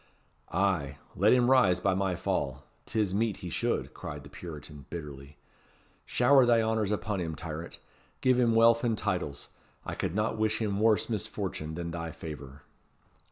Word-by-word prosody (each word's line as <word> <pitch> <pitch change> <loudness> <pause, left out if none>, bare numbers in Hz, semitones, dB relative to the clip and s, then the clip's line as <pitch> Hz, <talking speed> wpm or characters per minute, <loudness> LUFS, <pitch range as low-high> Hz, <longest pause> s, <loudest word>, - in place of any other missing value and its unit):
"Ay, 90 -8 0 0.2
let 100 +3 +4
him 125 0 +4
rise 95 -9 +5
by 95 +1 +2
my 95 -1 0
fall. 65 -5 -2 0.2
'Tis 105 -4 0
meet 110 0 0
he 90 - -5
should," - - -1
cried 75 -1 -7
the 70 - -13
Puritan, 75 -4 -9
bitterly. 70 -3 -8 0.7
"Shower 130 +2 +5
thy 120 -1 +5
honours 110 -2 +1
upon 105 -2 -1
him, 80 -2 -3
tyrant. 80 +1 -6 0.4
Give 130 -1 +3
him 115 -2 +3
wealth 115 +1 +5
and 115 -3 +1
titles. 70 -6 -3 0.4
I - - -4
could 85 - -3
not 110 +1 0
wish 110 0 +1
him 100 -3 -1
worse 110 -1 +3
misfortune 80 -7 -3
than 85 0 -4
thy 85 0 -4
favour." 70 -4 -9
95 Hz, 160 wpm, -29 LUFS, 75-110 Hz, 0.7 s, rise